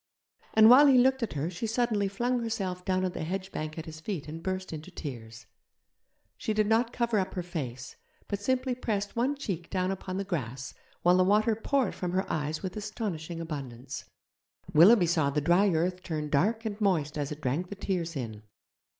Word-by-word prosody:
And 220 0 +8
while 265 +5 +9
he 265 -2 +6
looked 265 +1 +4
at 230 - -2
her 150 +4 -2
she 185 +6 -3
suddenly 220 -3 +1
flung 240 +6 0
herself 195 -6 -3
down 185 0 +1
on 185 - -1
the 175 - -5
hedge 190 +3 -4
bank 155 +1 -5
at 160 - -5
his 155 -1 -9
feet 165 -3 -4
and 160 +2 -7
burst 185 0 -3
into 155 +3 -7
tears. 115 -9 -8 0.9
She 215 - -1
did 215 0 +3
not 225 +2 +2
cover 235 -3 +1
up 190 0 -3
her 180 - -2
face, 135 -7 -6 0.3
but 200 -1 -3
simply 255 +3 0
pressed 210 -5 -2
one 255 +5 +1
cheek 185 - -4
down 185 0 0
upon 190 -1 -4
the 195 - -1
grass 135 - -4 0.3
while 180 +1 +5
the 185 - +5
water 210 +4 +3
poured 255 +1 0
from 180 -1 -4
her 190 +1 +1
eyes 155 +2 -2
with 185 -1 -4
astonishing 200 -6 -4
abundance. 135 -6 -6 0.7
Willoughby 180 +5 +7
saw 160 -4 +2
the 145 +1 0
dry 175 +7 +4
earth 180 +2 0
turn 155 -4 -4
dark 220 +10 +2
and 215 0 -4
moist 165 -8 +1
as 145 -1 -2
it 150 - -5
drank 150 +7 -1
the 200 - -6
tears 175 -4 -2
in. 110 -6 -5
185 Hz, 200 wpm, -29 LUFS, 155-215 Hz, 0.9 s, while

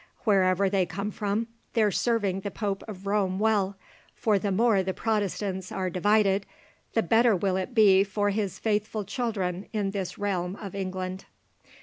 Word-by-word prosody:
Wherever 195 -2 +3
they 190 -2 +1
spring 195 +5 -4
from, 210 +3 -1 0.3
they're 215 -3 +3
serving 205 -4 +1
the 200 - -4
Pope 200 -1 -3
of 200 -2 -9
Rome 195 -2 +1
well, 200 -2 +1 0.4
for 210 -3 +2
the 200 +1 -1
more 215 0 +3
the 190 0 -3
Protestants 200 -3 -2
are 185 -1 -2
divided, 200 +1 +2 0.5
the 225 - +3
better 225 +4 +4
will 185 +1 0
it 190 +7 -3
be 195 -3 +6
for 205 +1 0
his 200 -2 -2
faithful 215 0 -1
children 195 -4 -2
in 205 -3 0
this 195 -3 -4
realm 190 -2 -2
of 200 -3 -8
England." 185 -1 -4
200 Hz, 160 wpm, -27 LUFS, 190-210 Hz, 0.5 s, be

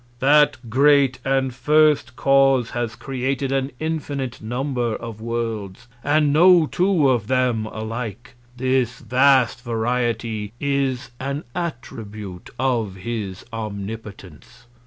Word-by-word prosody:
That 145 -1 +3
great 135 +1 +4
and 135 -1 0
first 150 -2 +3
Cause 135 -3 +3
has 120 -2 -3
created 135 +1 -2
an 135 0 0
infinite 145 -5 -3
Number 120 0 -2
of 115 -2 -8
Worlds, 115 -5 -4 0.2
and 145 0 +2
no 175 +1 +6
two 175 -2 +2
of 120 -6 +1
them 125 -4 +1
alike. 115 +1 -6 0.2
This 130 -1 0
vast 130 0 +3
Variety 115 -2 -2
is 135 -3 -1
an 140 +3 -3
Attribute 110 - -6
of 120 -7 0
his 100 -1 -5
Omnipotence. 100 -6 -8
125 Hz, 110 wpm, -22 LUFS, 115-140 Hz, 0.2 s, no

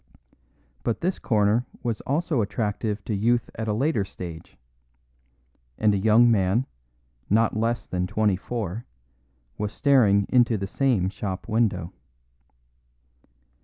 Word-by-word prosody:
But 115 - -2
this 180 +2 -1
corner 110 +2 +1 0.2
was 115 -3 -2
also 150 -1 0
attractive 105 0 -2
to 110 - -2
youth 115 +4 +1
at 110 0 -5
a 105 - +1
later 130 -1 +1
stage; 85 -4 -9 1.2
and 105 -1 +3
a - - +1
young 110 +4 +5
man, 100 +4 +2 0.6
not 110 +2 +3
less 115 +2 -1
than 90 0 -2
twenty 105 0 +1
four, 110 +1 -5 0.7
was 105 0 -2
staring 105 -9 +3
into 120 -3 +3
the 95 - -3
same 105 -4 +1
shop 95 -2 -5
window. 105 -6 0
110 Hz, 125 wpm, -25 LUFS, 100-120 Hz, 1.2 s, young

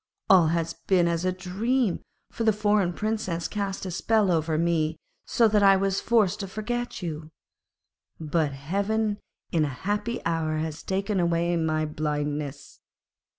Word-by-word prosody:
All 180 -4 +7
has 165 0 0
been 180 -3 +4
as 170 +1 -1
a 185 - +2
dream, 195 +4 -1 0.3
for 230 - -3
the 220 - +5
foreign 205 -3 +2
Princess 200 -4 -2
cast 200 -2 -3
a 185 - -4
spell 210 +2 +2
over 160 -1 +1
me 160 -1 +1 0.3
so 230 - +4
that 210 -1 +3
I 195 -1 +7
was 195 0 0
forced 220 -6 +2
to 195 - -4
forget 235 +2 -4
you; 155 -2 -5 0.9
but 155 -1 0
heaven 200 +9 -1 0.3
in 160 -2 +2
a - - +1 0.2
happy 210 +4 -1
hour 160 -1 0
has 155 0 -3
taken 195 +1 -1
away 170 0 +1
my 155 -1 0
blindness.' 150 -1 -3
180 Hz, 150 wpm, -26 LUFS, 160-205 Hz, 0.9 s, All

